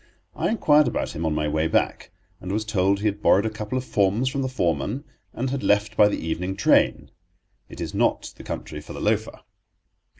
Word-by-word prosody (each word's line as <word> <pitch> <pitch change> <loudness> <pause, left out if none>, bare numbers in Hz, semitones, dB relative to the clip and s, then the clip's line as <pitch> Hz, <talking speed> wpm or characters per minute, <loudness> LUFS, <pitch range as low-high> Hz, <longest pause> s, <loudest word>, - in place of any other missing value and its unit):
I - - 0
inquired 150 - +4
about 120 - -2
him 80 +1 -2
on 75 - 0
my 75 0 0
way 80 +2 0
back, 80 - 0 0.3
and 90 - -6
was 110 +2 -1
told 100 -1 +1
he - - -3
had 105 -1 0
borrowed 100 +1 +4
a 110 - -1
couple 105 +3 -4
of 130 - -2
forms 105 +3 +1
from 135 +1 -2
the 130 - -1
foreman 120 - -1 0.3
and 130 +2 -3
had 135 -1 -2
left 105 +1 +1
by 105 - +6
the 105 - -1
evening 90 +4 -3
train. 100 - +2 0.6
It - - -11
is - - -4
not - - 0
the - - -12
country 75 - -6
for - - -10
the - - -7
loafer. - - -1
105 Hz, 210 wpm, -24 LUFS, 90-125 Hz, 0.6 s, by